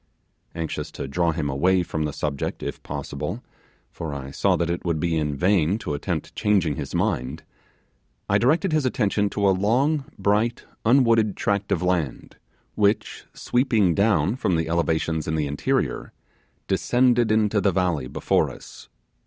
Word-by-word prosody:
Anxious 80 -2 -4
to - - -5
draw 85 +5 0
him 80 -2 -2
away 90 +7 +2
from 80 -2 -2
the 75 - -2
subject, 70 -1 -3
if - - -5
possible 70 -1 -5 0.5
for 80 -3 -5
I 70 -1 -6
saw - - +2
that 85 0 0
it 85 - -3
would 85 -3 -1
be 85 0 0
in 75 -2 -1
vain 90 +2 +2
to 105 -9 -4
attempt 70 - -3
changing 95 -8 +1
his - - -5
mind 65 +6 -1 0.8
I - - +3
directed 160 +9 +2
his 155 -2 +2
attention 105 -5 +1
to 100 0 0
a - - +5
long 130 +10 +1
bright 110 +4 0 0.2
unwooded 115 -4 +4
tract 100 0 -1
of - - +1
land 85 -8 -2 0.4
which, 105 0 0
sweeping 115 -8 +2
down 100 - +2
from 95 -9 0
the 80 0 -1
elevations 80 -1 0
in 80 - 0
the 75 -2 0
interior, 70 0 -1 0.5
descended 120 -2 +2
into 105 -1 +2
the 100 - +3
valley 85 -7 0
before - - +1
us. - - -12
90 Hz, 160 wpm, -24 LUFS, 80-110 Hz, 0.8 s, a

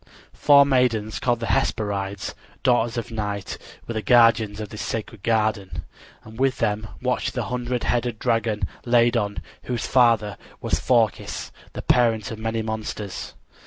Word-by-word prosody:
Four 140 -1 +6
maidens 125 -5 +1
called 120 -2 0
the - - -1
Hesperides, 100 -3 -1 0.3
daughters 120 -2 +2
of 120 - -4
Night, 105 -3 -4 0.3
were 115 - -3
the 110 - -2
guardians 115 -3 +4
of 105 -2 -5
this 110 - -7
sacred 110 -2 -4
garden, 110 -3 0 0.4
and 110 +2 -12
with 135 -2 +2
them 105 +1 -1 0.2
watched - - -1
the - - -1
hundred 125 -1 -2
headed 120 -1 0
dragon, 115 -2 0 0.2
Ladon, 120 -4 +2 0.2
whose 120 -3 -2
father 115 -6 +3 0.2
was - - -1
Phorkys, - - 0 0.2
the - - -6
parent 115 -4 +2
of 110 - -6
many 115 0 -2
monsters. 110 -2 -5
115 Hz, 145 wpm, -24 LUFS, 105-120 Hz, 0.4 s, Four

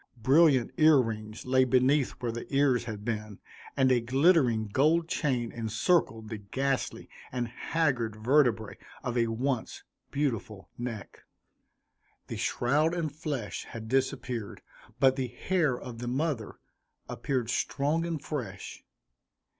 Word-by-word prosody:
Brilliant 135 +1 +4
ear 155 -2 +7
rings 110 -3 -4
lay 130 0 +4
beneath 130 +2 +3
where 120 -2 -4
the 120 +1 -7
ears 135 -4 +3
had 105 -3 -6
been; 105 -3 -3 0.4
and 130 -1 +4
a 125 - +4
glittering 130 -3 +3
gold 155 +9 +2
chain 125 -8 -1
encircled 115 - 0
the 110 -2 -5
ghastly 135 +7 -2 0.2
and 125 -2 -2
haggard 120 -2 -1
vertebræ 115 -2 +2 0.3
of 125 -1 -3
a 120 -1 +2
once 125 +2 -2 0.3
beautiful 115 -9 -3
neck 120 -4 -6 1.1
The - - -4
shroud 150 +7 +1
and 160 -4 -2
flesh 145 - -4
had 110 -1 -8
disappeared, 125 -3 -2 0.4
but 130 0 +4
the 130 -1 -1
hair 145 +1 0
of 120 -2 -8
the 120 - -5
mother 130 -3 -2 0.5
appeared 125 -4 -2
strong 145 +5 0
and 170 -2 -2
fresh. 145 -3 -6
125 Hz, 130 wpm, -29 LUFS, 115-145 Hz, 1.1 s, ear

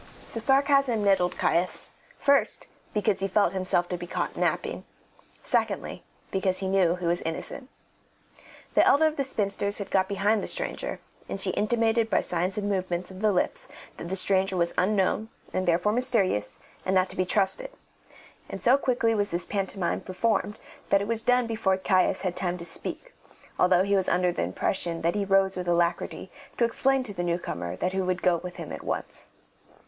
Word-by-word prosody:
The 230 - -3
sarcasm 270 -2 +3
nettled 195 -3 +2
Caius, 175 +2 0 0.3
first, 280 -1 +2 0.3
because 210 -1 0
he 195 - 0
felt 195 -1 +2
himself 185 -2 +1
to 180 - -2
be 175 - -6
caught - - -3
napping; - - -1 0.6
secondly, - - -1 0.3
because 190 -1 0
he 190 - -2
knew 190 -3 +3
he 180 -1 -6
was 170 +1 +1
innocent. 210 +10 -5 1.0
The - - +5
elder 300 +3 +5
of 310 -1 +1
the 275 - 0
spinsters 200 -5 0
had 200 - -5
got 190 -1 +2
behind 200 +2 +1
the - - -4
stranger, - - -3 0.3
and - - -4
she 190 -1 +3
intimated 225 +2 +1
by - - +2
signs 180 +3 -1
and 205 -1 -1
movements 185 -2 -2
of 185 +1 -10
the 215 -1 +3
lips - - +1 0.3
that 170 - -7
the 190 - -1
stranger 190 0 +2
was 170 -1 +1
unknown, 205 +3 +1 0.2
and 185 0 -1
therefore 175 +4 +2
mysterious, 220 - +1 0.2
and 190 - 0
not 185 0 +3
to - - -10
be 185 - +1
trusted; 205 - 0 0.8
and - - -6
so 255 +3 +5
quickly 240 -4 +1
was 205 -1 0
this 175 +1 -2
pantomime 195 -3 -2
performed 210 +2 -1 0.3
that 200 - +4
it 200 - -3
was 230 0 +1
done 250 +1 +3
before 215 -4 0
Caius 185 -1 +2
had 185 -2 -2
time 180 -1 -2
to 170 - -7
speak, - - -2 0.5
although 180 0 +4
he 200 +1 +1
was 190 -1 +1
under 180 0 +2
the - - -3
impression 165 - -2
that 170 +1 +2
he 205 -1 -1
rose 195 0 +3
with 180 -1 -4
alacrity 175 0 0 0.3
to 235 - +3
explain 270 +3 +1
to 215 -5 -8
the 175 - -3
newcomer 170 - -3
that 185 - -2
he 190 - 0
would 185 -1 -2
go 175 -2 +4
with 180 +1 -8
him - - -7
at - - -6
once. - - -5
195 Hz, 190 wpm, -27 LUFS, 180-220 Hz, 1.0 s, The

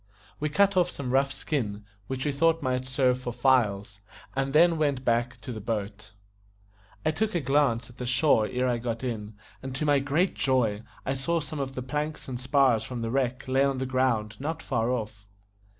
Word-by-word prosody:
We 150 - -1
cut 200 +6 +3
off 180 -1 +3
some 135 -6 -4
rough 135 +1 +3
skin, 105 -9 -3 0.2
which 130 +1 -3
we 145 - +1
thought 165 +3 +2
might 130 -1 -1
serve 130 -1 +2
for 125 -1 -4
files, 110 -5 +1 0.4
and 135 0 0
then 165 +2 +5
went 140 -4 0
back 120 +1 +1
to 120 - -6
the 110 -2 -6
boat. 105 -1 -4 0.9
I - - +3
took 215 +5 -1
a - - +3
glance 135 -5 +2
at 120 - -17
the 125 - -3
shore 130 -4 +3
ere 125 0 0
I 120 -1 0
got 115 0 -3
in, 110 -4 -4 0.3
and 130 0 -6
to 150 - -1
my 145 -1 +4
great 145 +7 +1
joy 120 -6 +1 0.3
saw 150 +6 0
some 155 -1 -6
of 135 -1 -3
the 130 - -4
planks 150 +4 -3
and 125 -2 -5
spars 130 -4 +3
from 120 0 -5
the 115 - -2
wreck 130 -1 -1
lay 130 +1 +3
on 140 -1 +1
the 130 - -2
ground 125 -5 0
not 160 +3 -4
far 115 -3 0
off. 110 -4 -4
130 Hz, 200 wpm, -27 LUFS, 115-140 Hz, 0.9 s, then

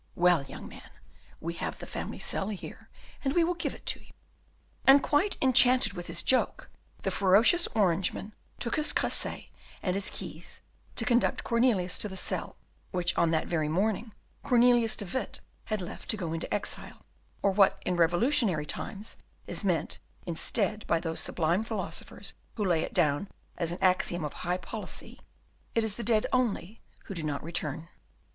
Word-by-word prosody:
Well, 175 -3 +4
young 135 0 -9
man, - - -12 0.5
we 170 +1 -4
have 170 - -4
the - - -8
family - - -5
cell 195 - -2
here, 205 -4 -8 0.3
and 270 0 0
we 345 - +5
will 350 +2 +1
give 350 - -3
it - - -16
to - - +1
you." - - -19 0.8
And 275 +1 +8
quite 315 +8 +2
enchanted 255 -4 +5
with 175 -2 -7
his 170 0 0
joke, 260 - +2 0.3
the - - 0
ferocious 220 - +5
Orangeman 190 +1 +1 0.3
took 235 +2 -1
his 300 0 +3
cresset - - 0 0.3
and 180 - +1
his 195 0 0
keys - - -7 0.3
to 230 - -1
conduct 240 +1 +2
Cornelius 230 -7 +2
to 210 - -1
the 190 - -6
cell, - - -1 0.3
which 180 -2 +1
on 170 - +3
that 160 -1 +1
very 155 -3 0
morning 210 +6 0 0.3
Cornelius 240 -2 +4
de 205 - -5
Witt 260 +8 -3 0.3
had 215 -4 -2
left 175 - -9
to 215 - 0
go 170 -5 -3
into 165 - -4
exile, 205 - -3 0.4
or 200 - +4
what 195 0 +4
in 180 - +1
revolutionary 175 - +2
times 200 +7 -5 0.3
is - - -3
meant 170 -6 0 0.3
instead 200 +5 0
by 165 - +3
those 165 -1 -2
sublime 170 +5 +2
philosophers 220 -3 -4 0.2
who 210 - -1
lay 170 -4 +3
it - - -5
down 155 +1 +2 0.3
as 170 -2 0
an 175 - -4
axiom 180 -3 +2
of 150 - -5
high 180 0 -2
policy, 205 +5 -4 0.6
"It 230 - +3
is 220 -2 +1
the 235 - -6
dead 220 -1 +2
only 230 -5 0 0.2
who - - -7
do 170 - -3
not 150 -2 -3
return." 160 -1 -2
195 Hz, 175 wpm, -29 LUFS, 170-230 Hz, 0.8 s, And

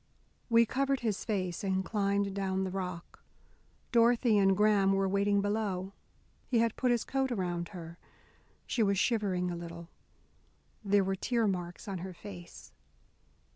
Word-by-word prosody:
We 230 0 +6
covered 275 +3 0
his 220 -4 -1
face 185 -5 -2
and 190 -1 0
climbed 200 -2 0
down 190 -1 -1
the 190 - -3
rock. 180 -2 -6 0.7
Dorothy 235 -1 +4
and 195 -1 +4
Graham 205 -2 +4
were 195 0 +2
waiting 200 +1 +2
below. 200 -2 -2 0.5
He 245 - +1
had 230 -1 +2
put 255 - 0
his 240 -2 +2
coat 270 -1 -1
around 175 -5 -2
her. 170 -3 -9 0.7
She 240 - -1
was 200 -2 +3
shivering 190 -5 +1
a - - -3
little. 170 0 -8 0.9
There 200 -1 +3
were 195 0 -1
tear 230 +4 0
marks 180 +1 -4
on 195 -3 -4
her 185 +1 -6
face. 180 -3 -11
195 Hz, 150 wpm, -31 LUFS, 185-220 Hz, 0.9 s, We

